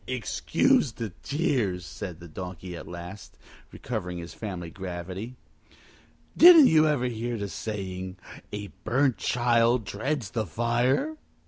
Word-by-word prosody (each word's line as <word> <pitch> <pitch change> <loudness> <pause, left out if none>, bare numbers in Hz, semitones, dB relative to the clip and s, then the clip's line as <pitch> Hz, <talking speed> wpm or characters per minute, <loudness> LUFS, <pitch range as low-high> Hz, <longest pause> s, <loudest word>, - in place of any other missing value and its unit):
"Excuse 260 - +1
these 115 -4 -5
tears," 120 - -1
the 85 -4 -6
Donkey 90 +2 -7
said 85 - -6
at - - -10
last, 90 +3 -9 0.3
recovering 95 -7 -4
his 85 0 -7
family 90 -6 -6
gravity. 95 +5 -6 1.0
"Didn't 335 -3 +10
you 155 -7 +5
ever 145 -5 +1
hear 120 0 -2
the 100 -1 -3
saying, 95 -3 -5 0.3
A 105 -1 -5
burnt 130 +2 +2
child 120 -1 +2
dreads 115 +1 -3
the 110 -3 -2
fire?" 120 - +1
110 Hz, 125 wpm, -27 LUFS, 90-125 Hz, 1.0 s, Didn't